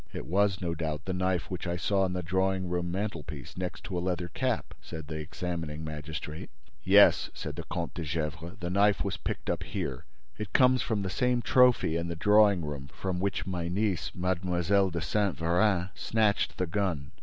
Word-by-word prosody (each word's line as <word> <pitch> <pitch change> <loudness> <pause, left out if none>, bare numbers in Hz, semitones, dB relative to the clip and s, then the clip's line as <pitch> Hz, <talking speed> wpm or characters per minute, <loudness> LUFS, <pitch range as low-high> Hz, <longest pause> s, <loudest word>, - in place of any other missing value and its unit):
"It - - -5
was, 100 +2 +2
no 85 -2 -1
doubt, 80 -1 -3
the 95 - -2
knife 90 -2 -1
which 90 0 -4
I 85 - -1
saw 95 +3 +1
on 95 -1 +1
the 90 0 -2
drawing 95 +1 0
room 90 0 -1
mantelpiece, 85 - -4
next 90 -1 -4
to 95 - -5
a - - +1
leather 90 -1 -2
cap?" 125 +6 -1
said 80 -2 -7
the 80 +1 -5
examining 80 0 -4
magistrate. 75 0 -6 0.3
"Yes," - - +6
said - - -5
the - - -6
Comte 85 -2 -3
de 85 - -5
Gesvres, 80 +4 -3
"the 90 -1 -3
knife 100 +1 +3
was 95 -3 -2
picked - - -5
up - - -1
here. - - -4 0.3
It 105 -3 -5
comes 130 -1 +5
from 110 -4 -1
the 95 - -2
same 125 0 +1
trophy 125 -10 +4
in 85 0 -2
the 85 - -3
drawing 105 -1 +5
room 70 -2 -5
from 90 +5 -4
which 95 -2 -1
my 90 -2 -2
niece, 95 -4 0
Mlle. 90 +2 +1
de 85 -1 -3
Saint 100 +4 0
Véran, 90 +2 +2
snatched 110 -2 +1
the 90 - +1
gun. 85 -6 -2
90 Hz, 195 wpm, -29 LUFS, 85-100 Hz, 0.3 s, Yes